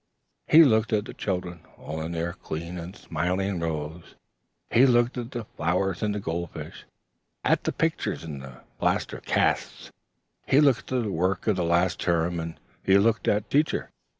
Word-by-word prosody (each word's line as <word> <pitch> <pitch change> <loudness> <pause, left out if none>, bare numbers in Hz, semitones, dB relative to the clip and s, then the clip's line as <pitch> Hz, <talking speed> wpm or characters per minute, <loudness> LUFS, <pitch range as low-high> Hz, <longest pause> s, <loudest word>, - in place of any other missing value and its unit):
He 165 +2 +9
looked 110 -5 +3
at 105 -1 +1
the - - -8
children 90 -3 -3 0.2
all 80 +2 -6
in 80 +2 -4
their 85 +1 -2
clean 85 +3 -6
and 85 +4 -8
smiling 90 +3 -2
rows; 80 0 -4 0.6
he 130 +4 +6
looked 120 0 +3
at 120 -2 -4
the 120 -4 -5
flowers 90 +2 -1
and 105 -1 0
the - - -2
gold 85 -2 -3
fish; - - -9 0.6
at - - +2
the - - +1
pictures - - -1
and 75 -4 -6
the 65 -2 -11 0.2
plaster - - 0
casts; - - 0 0.6
he 135 - +5
looked 140 -6 +3
at 125 -2 +1
the 105 - -2
work 90 +2 0
of 110 - +2
the 90 - 0
last 85 +1 +2
term 85 0 +1
and 80 0 -6 0.2
he 95 0 +5
looked 110 +3 +2
at 105 0 +2
Teacher. 150 +2 +1
90 Hz, 180 wpm, -26 LUFS, 85-110 Hz, 0.6 s, He